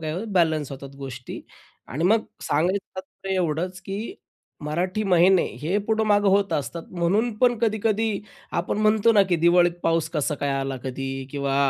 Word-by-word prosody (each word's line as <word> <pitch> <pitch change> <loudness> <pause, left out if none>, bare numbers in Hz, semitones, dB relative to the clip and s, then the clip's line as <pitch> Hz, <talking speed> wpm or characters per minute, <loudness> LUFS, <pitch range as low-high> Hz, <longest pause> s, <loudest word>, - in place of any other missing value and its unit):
काय 155 -1 -3
होतं 205 +5 -5
बॅलन्स 160 -6 +2
होतात 135 0 -8
गोष्टी 130 -2 -7 0.5
आणि 150 +6 -2
मग 220 +4 +3 0.2
सांगायचं 180 +7 0
तात्पर्य 190 +1 -5
एवढंच, 180 +1 -1
की 200 - -5 0.5
मराठी 180 +7 -1
महिने 185 0 +5 0.2
हे 175 +6 0
पुढं-मागं 210 -2 +2
होत 200 +1 +2
असतात. 165 +4 -2
म्हणून 190 +7 +1
पण 245 -1 +3
कधी-कधी 220 0 +1 0.5
आपण 185 +4 -3
म्हणतो 215 +1 +4
ना; 205 - +6
की 175 - +2
दिवाळीत 175 0 +5
पाऊस 165 -1 +1
कसा 150 -1 -1
काय 145 0 -2
आला 135 -1 -3
कधी? 135 +1 -4 0.2
किंवा 140 -1 -1
180 Hz, 160 wpm, -24 LUFS, 155-205 Hz, 0.5 s, ना